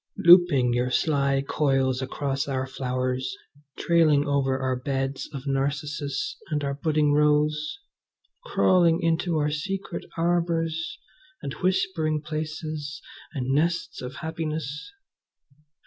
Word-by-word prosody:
looping 170 -9 +6
your 125 +1 +1
sly 140 -1 +1
coils 135 -3 +1
across 135 +1 -2
our 130 -2 -1
flowers, 130 -1 -2 0.4
trailing 155 -4 +3
over 140 -2 +1
our 130 -1 -1
beds 135 +1 -3
of 140 -2 -7
narcissus 140 +1 -2
and 150 -1 -1
our 140 0 -1
budding 150 0 +1
rose, 150 - +2 0.7
crawling 175 - +3
into 165 0 +1
our 150 0 +1
secret 190 +6 -4
arbours 170 - 0 0.5
and 140 - -4
whispering 170 -4 +1
places 155 -1 -5 0.4
and 130 -1 -1
nests 165 +3 0
of 125 +1 -6
happiness! 160 - -4
150 Hz, 110 wpm, -26 LUFS, 135-160 Hz, 0.7 s, looping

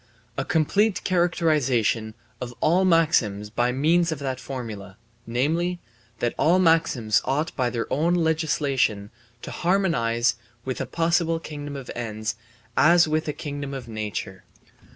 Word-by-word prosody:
A 135 - -1
complete 190 +8 +1
characterization 145 - +1 0.3
of 120 -1 -6
all 175 +5 +3
maxims 120 - +2
by 120 +2 +1
means 165 +6 +2
of 160 - -2
that 130 -2 -4
formula, 110 -7 -7 0.3
namely, 165 +9 0 0.4
that 120 - -1
all 165 +6 +4
maxims 160 - +3
ought 150 +4 -1
by 125 -2 +1
their 120 -2 -2
own 165 +5 +2
legislation 145 -10 0 0.3
to - - -6
harmonize 120 - +1 0.3
with 130 -1 -3
a - - -3
possible 165 0 +1
kingdom 145 -2 -7
of 135 -3 -7
ends 110 -2 -3 0.4
as 170 +1 +5
with 155 +1 -1
a 150 - -1
kingdom 145 -2 -5
of 130 -3 -7
nature. 105 -4 -5
140 Hz, 135 wpm, -24 LUFS, 120-165 Hz, 0.4 s, as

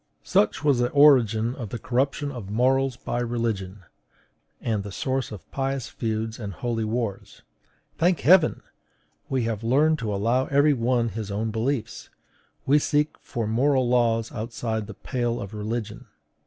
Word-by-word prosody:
Such 125 +6 +1
was 140 -4 +3
the 120 0 +2
origin 120 -6 +5
of 120 -6 -7
the 120 - -4
corruption 135 +5 -1
of 115 -7 -8
morals 130 +3 +2
by 120 - -3
religion, 110 -5 -3 0.8
and 110 -3 -1
the 100 0 -7
source 130 +4 -2
of 105 -4 -10
pious 135 -2 -2
feuds 110 0 -3
and 100 -3 -5
holy 115 +5 -2
wars. 110 -2 -4 0.6
Thank 175 0 +2
Heaven! 175 -1 +5 0.7
we 130 -3 0
have 115 -1 -3
learned 150 +6 +3
to 110 -3 -3
allow 115 +6 +1
every 145 +1 +4
one 120 -1 +1
his 110 -2 -5
own 110 +2 -2
beliefs; 115 +1 -3 0.6
we 145 +3 +5
seek 150 +1 +1
for 115 -2 -4
moral 130 +4 +2
laws 115 -2 +2
outside 110 -1 -4
the 110 - -9
pale 120 -1 -2
of 100 +1 -7
religion. 110 +1 -4
120 Hz, 155 wpm, -25 LUFS, 110-135 Hz, 0.8 s, origin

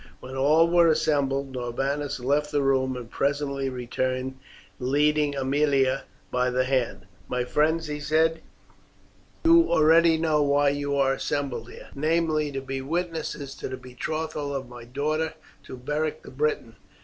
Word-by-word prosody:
When 130 +1 -9
all 150 +5 +4
were 170 0 +5
assembled 140 -3 +1
Norbanus 135 +4 -2
left 145 +4 0
the 145 -1 +1
room, 130 -1 +1
and 120 -2 -7
presently 140 +1 -1
returned 130 +1 -3 0.4
leading 145 +2 +2
Aemilia 135 -1 +1 0.3
by 125 0 +1
the 125 +1 +1
hand. 130 -6 -1 0.2
"My 125 0 -1
friends," 160 +5 +1
he 150 -1 -4
said, 160 +2 +1 1.0
"you 335 +1 +6
already 160 +1 +5
know 160 -2 +2
why 145 0 +3
you 145 0 -1
are 135 -1 +3
assembled 130 -5 -3
here, - - -12
namely 155 0 +1
to 135 -1 -4
be 135 0 -4
witnesses 160 -2 -3
to - - -5
the 130 - -5
betrothal 145 +3 -4
of 135 -2 -4
my 120 -1 -11
daughter 155 +5 -2 0.3
to 130 - -8
Beric 150 +4 -2
the - - -11
Briton. 130 -5 -2
140 Hz, 150 wpm, -26 LUFS, 130-155 Hz, 1.0 s, you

